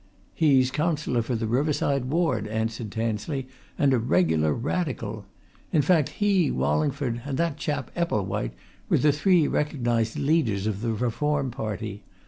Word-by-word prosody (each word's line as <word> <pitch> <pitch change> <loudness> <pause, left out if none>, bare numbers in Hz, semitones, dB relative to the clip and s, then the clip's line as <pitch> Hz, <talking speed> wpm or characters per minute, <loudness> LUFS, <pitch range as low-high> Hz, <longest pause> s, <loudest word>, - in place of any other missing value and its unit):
"He's 135 -5 +3
Councillor 150 -4 0
for 120 +2 -2
the 115 0 -2
Riverside 140 +2 +1
Ward," 130 - 0
answered 110 +1 -3
Tansley, 115 +5 -2 0.3
"and 140 -2 +3
a 125 - +3
regular 80 -9 +2
Radical. 115 - -3 0.4
In 150 - +3
fact 160 -2 +3
he, 195 -7 +3
Wallingford, 140 -5 0
and 135 -1 -3
that 165 -3 0
chap 145 -3 -3
Epplewhite, 105 - -1 0.3
were - - +4
the 150 - +4
three 160 +1 +3
recognized 120 -6 0
leaders 140 -10 +1
of 105 -2 -2
the 115 -1 0
Reform 135 +4 0
party. 110 -2 -5
130 Hz, 140 wpm, -26 LUFS, 110-150 Hz, 0.4 s, were